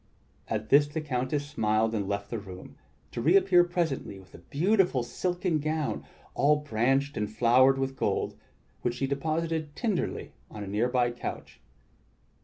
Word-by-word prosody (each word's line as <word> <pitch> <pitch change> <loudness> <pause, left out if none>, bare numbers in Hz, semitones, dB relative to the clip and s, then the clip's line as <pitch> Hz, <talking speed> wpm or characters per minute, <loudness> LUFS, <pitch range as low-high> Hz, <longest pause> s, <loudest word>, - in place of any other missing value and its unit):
At 110 - -3
this 145 +1 +6
the 145 +2 -4
Countess 140 0 -2
smiled 110 -5 +1
and 100 -3 -2
left 100 0 -3
the 115 - -2
room, 95 -3 -11 0.4
to - - -4
reappear 180 +4 +5
pres 175 -2 0
ently 100 -7 -6
with 95 -1 -18
a - - -11
beautiful 180 - +1
silken 175 +4 -1
gown 155 0 -2 0.3
all 150 +2 +4
branched 135 +1 0
and 105 -1 -1
flowered 125 +4 +4
with 135 0 -2
gold, - - -1 0.5
which 120 0 -1
she 135 - -1
deposited 155 +2 -2
tenderly 215 -7 -2 0.2
on 105 - -7
a - - -7
near 105 +5 0
by 125 -1 +2
couch. 120 - -7
135 Hz, 160 wpm, -28 LUFS, 115-155 Hz, 0.5 s, this